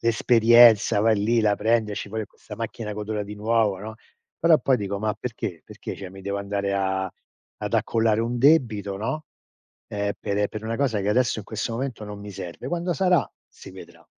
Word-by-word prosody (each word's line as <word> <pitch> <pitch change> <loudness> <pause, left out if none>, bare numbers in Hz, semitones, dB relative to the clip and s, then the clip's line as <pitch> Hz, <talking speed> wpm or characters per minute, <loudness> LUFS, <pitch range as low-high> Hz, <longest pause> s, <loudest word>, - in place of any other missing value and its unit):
l'esperienza, 115 -2 +5
vai 110 0 +3
lì, 115 +2 +2
la 105 -1 +3
prendi, 110 0 +1
esci 100 0 -5
fuori 110 +1 -3
con - - -35
questa - - -10
macchina 105 -2 -5
che 105 - -7
odora 105 0 -3
di 105 +1 -8
nuovo, 105 -2 +1
no. 110 +2 -7 0.4
Però 165 -1 +5
poi 130 -2 +2
dico: 100 -2 -3
"Ma 105 0 -1
perché 105 -8 -5
perché - - -8
cioè 95 -2 -8
mi 95 +1 -11
devo 100 +1 -3
andare 100 0 -2
a 95 -1 -1 0.5
ad - - -5
accollare 115 -1 +2
un 120 +1 -2
debito, 120 -9 +3
no, 155 +10 -3 0.6
ehm, 100 0 -2
per, 100 - -2
ehm, 105 0 +1
per 110 - -7
una 115 +1 -2
cosa, 125 -7 0
che 100 - -2
adesso 120 +2 +2
in - - -12
questo 110 +2 -4
momento 120 -3 -4
non 105 0 -8
mi 105 - -8
serve." 85 -2 -7
Quando 175 +1 -1
sarà 180 0 +2 0.2
si - - -13
vedrà. - - -13
110 Hz, 205 wpm, -24 LUFS, 100-115 Hz, 0.6 s, l'esperienza